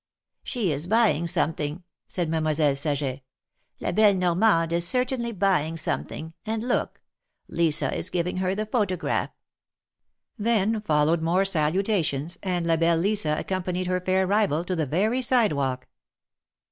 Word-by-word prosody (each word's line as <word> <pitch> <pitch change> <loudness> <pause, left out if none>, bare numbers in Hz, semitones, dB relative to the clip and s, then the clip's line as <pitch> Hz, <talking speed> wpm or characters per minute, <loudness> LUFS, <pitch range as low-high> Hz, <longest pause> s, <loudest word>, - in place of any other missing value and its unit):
'^She 235 - -1
is 150 +4 -2
buying 215 -6 +2
something," 160 +1 -1 0.2
said 175 -3 -2
Mademoiselle 155 -2 +1
Saget. 140 -2 -1 0.6
La - - -2
belle 210 -2 +4
Normande 175 -1 +2
is 170 0 +1
certainly 250 0 0
buying 180 -6 0
something 160 -1 -3
— - - -57
and 225 +2 -2
look! 245 - -1 0.5
Lisa 160 -3 +1
is - - -3
giving 180 0 -2
her 185 +1 0
the 215 +1 -2
photograph! 205 -6 -1 0.6
" - - -57 0.3
Then 220 0 +1
followed 160 -2 +2
more 175 +4 +2
salutations, 170 -2 +1
and 180 -3 -2
La 165 -1 +2
belle 165 0 +2
Lisa 180 -4 +1
accompanied 185 -1 -2
her 180 0 -1
fair 185 +1 +1
rival 195 -5 +1
to 185 - -2
the 160 -4 -1
very 215 - +1
sidewalk. 145 - +1
180 Hz, 145 wpm, -25 LUFS, 160-205 Hz, 0.6 s, belle